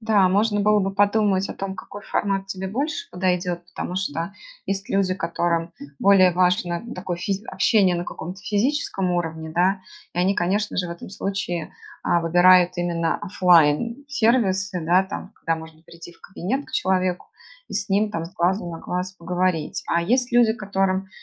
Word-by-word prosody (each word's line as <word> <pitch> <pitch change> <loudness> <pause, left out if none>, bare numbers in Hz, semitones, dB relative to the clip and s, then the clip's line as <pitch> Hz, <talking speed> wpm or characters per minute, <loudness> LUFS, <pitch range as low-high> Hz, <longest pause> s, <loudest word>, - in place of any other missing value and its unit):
да, 215 -4 +3
можно 205 +1 +2
было 210 0 +4
бы 195 0 -2
подумать 205 -1 +2
о - - -3
том, 195 -1 -5
какой 200 +2 -9
формат 195 -1 -1
тебе 190 -1 -5
больше 310 - -3
подойдет. 180 -1 -1
Потому 175 +1 -5
что 170 -1 -3 0.3
есть 195 0 -3
люди, 195 -1 +1
которым 170 -1 -1 0.2
более 190 -2 +5
важно, 180 -1 +2
н 240 - -7
такое, 180 -1 -4
физ 195 +3 -2
общение 195 -6 +3
на 175 - -3
каком-то 180 +4 -7
физическом 210 -3 0
уровне, 160 -2 -3
да, 190 +2 +2 0.3
и 175 - -4
они, 190 +3 +3
конечно 205 +3 0
же, 180 - 0
в - - -7
этом 170 +2 -8
случае, 195 -5 -4 0.3
а, 175 - +2
выбирают 180 +1 +5
именно 170 -1 0
офлайн-сервисы, 200 - +2
да, 180 +2 +5
там 190 +1 -7
когда 165 - -1
можно 160 0 -11
прийти 170 +1 -12
в - - -26
кабинет 220 +9 -3
к - - -15
человеку, 185 -1 0 0.4
и - - -7
с 200 - -3
ним 205 +2 +2
там 165 -4 -3
с 170 - -10
глазу 180 0 0
на 165 - -7
глаз 180 +2 -4
поговорить. 180 -2 -1
А 170 - +1
есть 245 +8 +1
люди, 235 -2 +5
которым 195 -2 -1
185 Hz, 170 wpm, -23 LUFS, 175-200 Hz, 0.4 s, более